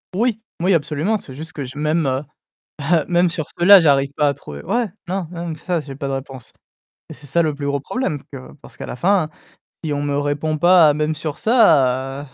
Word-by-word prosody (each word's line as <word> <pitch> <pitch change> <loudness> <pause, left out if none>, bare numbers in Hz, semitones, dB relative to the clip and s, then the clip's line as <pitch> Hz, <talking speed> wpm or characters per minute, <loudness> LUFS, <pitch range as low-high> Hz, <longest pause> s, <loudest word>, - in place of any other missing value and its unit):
Oui! 225 0 0 0.2
Oui 185 +2 +3
absolument, 155 +7 0
c'est 135 -9 -11
juste 160 +3 -8
que 145 - -5
je 130 +4 -10
même, 155 +2 +1 0.8
bah, 160 +1 +2
même 175 0 +3
sur 155 -3 -3
ceux-là 190 +3 +8
j'arrive 140 -4 +3
pas 150 -1 +3
à 140 - 0
trouver 70 -9 -10
ouais 235 +2 0 0.2
non, 185 -1 -2
non 170 0 -5
même 160 -2 -4
ça 175 +1 -2
j'ai 140 -3 -9
pas 140 - -4
de 135 - -3
réponse. 135 -2 -7 0.6
Et - - -7
c'est 145 - -12
ça 170 +5 +2
le 155 -2 -1
plus 145 0 -5
gros 140 0 0
problème 150 - -3
parce - - -44 0.2
que - - -14
parce - - -14
qu'à - - -6
la - - -6
fin, 180 0 +2 0.6
si 150 -2 -2
on 145 0 -2
me 145 -1 -1
répond 145 +2 -1
pas 175 -2 +6
même 155 +1 -1
sur 150 -1 -5
ça, 135 - +2
155 Hz, 225 wpm, -20 LUFS, 140-175 Hz, 0.8 s, ceux-là